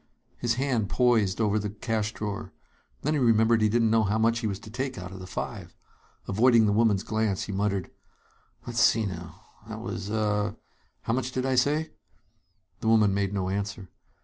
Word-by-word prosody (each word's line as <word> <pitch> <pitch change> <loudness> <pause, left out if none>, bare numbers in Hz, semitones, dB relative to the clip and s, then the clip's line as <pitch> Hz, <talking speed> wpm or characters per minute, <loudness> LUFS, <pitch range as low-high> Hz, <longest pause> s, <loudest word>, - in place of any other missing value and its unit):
His 120 -1 0
hand 125 -6 0
poised 115 -6 +2
over 110 -1 +2
the 105 0 -3
cash 110 0 -2
drawer. 105 -2 -5 0.5
Then 150 - +1
he 150 - +1
remembered 115 -2 +4
he 110 - +4
didn't 115 0 +2
know 115 0 +4
how 105 +1 +1
much 115 +1 +2
he 115 - -2
was 100 -2 -2
to 110 - -11
take 130 +2 -3
out 90 +1 -7
of 95 - -9
the 95 - -9
five. - - -6 0.5
Avoiding 115 +2 +4
the 105 - +2
woman's 105 -2 +3
glance, 110 -3 -1
he - - -5
muttered: 100 -2 -1 0.7
"Let's - - -3
see, 110 -1 +4
now, 90 -3 -7 0.2
that - - -6
was 100 +1 -5
uh 105 -1 0 0.5
how 115 - -1
much 130 +1 -1
did 130 0 -2
I 135 - +1
say?" 145 +5 +1 0.9
The - - -4
woman 110 -3 +4
made 100 -1 0
no 95 -2 -2
answer. 95 -2 -4
110 Hz, 190 wpm, -27 LUFS, 100-115 Hz, 0.9 s, remembered